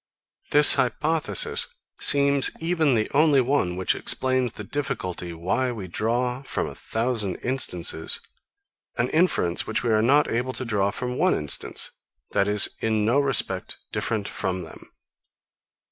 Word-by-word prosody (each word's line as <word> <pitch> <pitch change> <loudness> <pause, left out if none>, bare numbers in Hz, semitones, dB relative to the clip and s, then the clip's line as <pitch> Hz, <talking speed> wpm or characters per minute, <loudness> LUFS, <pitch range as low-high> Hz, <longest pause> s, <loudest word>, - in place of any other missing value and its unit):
This 150 0 +7
hypothesis 150 - +1 0.3
seems 140 -1 +5
even 160 -5 +1
the 110 -1 0
only 145 -1 +4
one 125 -9 0
which 95 0 0
explains 130 -2 0
the 105 - -8
difficulty, 90 -9 -5
why 90 +10 -2
we 105 -6 -7
draw, 120 +7 -2
from 135 - -3
a - - -7
thousand 110 -4 -2
instances, 90 -11 0 0.8
an - - 0
inference 155 - +1
which 110 - -2
we 120 - 0
are 110 0 +2
not 140 +6 +3
able 125 +3 -2
to 130 - -3
draw 100 -3 0
from 125 +4 -5
one 185 +3 +2
instance, 75 -2 +2 0.4
that 100 - +1
is, 105 0 +5
in 110 -1 -1
no 120 +6 +2
respect, 120 -9 +1
different 110 -3 -3
from 95 -2 -4
them. 80 - -14
120 Hz, 145 wpm, -24 LUFS, 100-140 Hz, 0.8 s, This